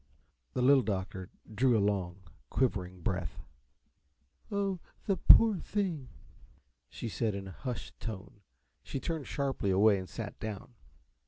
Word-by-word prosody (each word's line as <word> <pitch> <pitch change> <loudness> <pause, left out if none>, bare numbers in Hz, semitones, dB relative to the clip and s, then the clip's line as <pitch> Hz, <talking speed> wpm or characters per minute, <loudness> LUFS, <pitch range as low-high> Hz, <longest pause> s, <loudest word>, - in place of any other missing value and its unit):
The 125 - 0
Little 135 +1 +7
Doctor 95 -3 -3 0.2
drew 120 +2 +4
a - - +3
long, 100 -2 0 0.3
quivering 95 -8 0
breath. 90 -3 -2 1.1
"Oh, 200 -2 0 0.3
the 195 - +2
poor, 225 +4 +8
brave 190 - -4
thing!" 175 -11 -2 0.8
she - - -6
said, 110 -1 -1
in 100 -1 -5
a - - -7
hushed 120 0 -6
tone. 100 -2 -7 0.4
She 135 - -4
turned 160 -1 -3
sharply 135 -7 -1
away 100 +1 +5
and 95 - -7
sat 110 -3 -6
down. 110 +2 -6
110 Hz, 140 wpm, -32 LUFS, 95-135 Hz, 1.1 s, poor